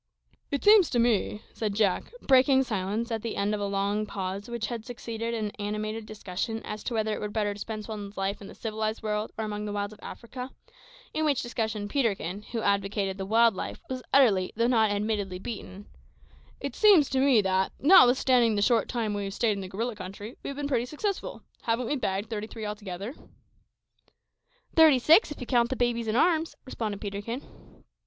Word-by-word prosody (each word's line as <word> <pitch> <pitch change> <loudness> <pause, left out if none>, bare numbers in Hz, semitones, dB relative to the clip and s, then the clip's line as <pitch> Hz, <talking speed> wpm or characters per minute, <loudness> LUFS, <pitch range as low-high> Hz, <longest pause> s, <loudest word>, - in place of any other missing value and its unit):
"It 280 - -2
seems 415 -4 +7
to 245 - 0
me," 225 -2 +1
said 210 -3 -2
Jack, 200 -4 +1
breaking 265 0 +5
silence 215 +1 -2
at 225 -1 -1
the 230 0 -4
end 200 +1 0
of 210 - -2
a 200 - 0
long 200 +2 -1
pause 195 +3 -4
which 235 -2 -3
had 230 -1 -4
succeeded 230 -1 -4
an 215 -2 -2
animated 215 +1 -3
discussion 215 +1 -4
as 210 0 -6
to 240 - -2
whether 220 -1 0
it - - -3
were 210 - -3
better 205 -1 -1
to 205 - -11
spend 215 0 -5
one's 205 -2 -7
life 195 +2 -2
in 200 - -9
the - - -11
civilised 220 0 -3
world 210 0 -2
or 220 - -2
among 210 0 -4
the 210 - -3
wilds 205 0 -3
of 210 - -16
Africa, 250 +2 -8 0.6
in 315 - 0
which 290 -4 +1
discussion 220 -3 -2
Peterkin, 205 - -1
who 230 -1 -2
advocated 200 -1 0
the 190 - -4
wild 230 +2 +5
life, 185 - -5
was 255 -1 -3
utterly, 210 -9 +4
though 230 +2 +2
not 225 -3 +3
admittedly, 205 -2 -1
beaten 200 -1 -7 0.7
"it - - -5
seems 390 -10 +6
to 265 - +1
me 265 -4 +5
that, 190 -1 +1
notwithstanding 255 - +6
the 205 - +1
short 235 0 +2
time 225 -4 -1
we 200 -1 -2
stayed 215 +3 +1
in 200 -1 -2
the 190 - -6
gorilla 230 +5 -3
country, 200 +4 -8
we - - -7
have 280 - -5
been 290 -1 -2
pretty 250 -3 0
successful. 385 +8 -4 0.2
Haven't 230 +2 0
we 290 - 0
bagged 200 -5 -2
thirty 215 -1 -3
three 225 -1 -7
altogether?" 205 +1 -5 1.6
"Thirty 315 -4 +7
six, 320 - +5
if 295 - -8
you 250 - -5
count 240 -1 +2
the 260 - -1
babies 240 -2 0
in 215 - 0
arms," 325 +3 +2
responded 215 -6 -4
Peterkin. 205 +5 -5
220 Hz, 200 wpm, -28 LUFS, 205-245 Hz, 1.6 s, seems